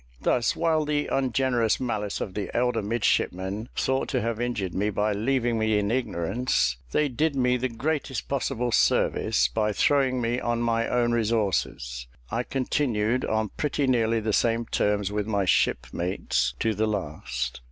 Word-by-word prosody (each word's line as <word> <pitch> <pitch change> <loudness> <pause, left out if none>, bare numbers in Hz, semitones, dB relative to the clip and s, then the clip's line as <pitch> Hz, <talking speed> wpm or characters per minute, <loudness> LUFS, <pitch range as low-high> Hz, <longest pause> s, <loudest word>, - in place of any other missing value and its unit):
Thus, 120 - +1
while 160 -2 +2
the 150 0 0
ungenerous 125 -3 +1
malice 105 -5 -2
of 95 - -4
the 100 -1 -3
elder 125 -2 +1
midshipmen 105 -1 -1
thought 130 0 0
to 130 -3 0
have 115 0 -2
injured 110 -7 -2
me 105 +2 0
by 105 +1 0
leaving 120 +2 0
me 110 -1 +2
in 105 +1 0
ignorance, 100 - 0
they 150 - +2
did 145 +3 0
me 125 -1 +2
the 125 +1 -1
greatest 135 0 -2
possible 125 -3 -1
service, - - +2
by 105 -1 0
throwing 130 +2 +2
me 120 +1 0
on 120 -1 -1
my 115 -1 +1
own 120 -1 +1
resources. 100 - -1 0.2
I 115 - 0
continued 125 -3 0
on 110 -1 0
pretty 145 -1 0
nearly 115 -3 +2
the 110 -1 -1
same 115 +1 +2
terms 105 -2 0
with 105 0 -2
my 100 -3 0
shipmates 90 0 0
to 115 -1 +2
the 110 +2 0
last. 75 - -3
115 Hz, 160 wpm, -26 LUFS, 105-125 Hz, 0.2 s, while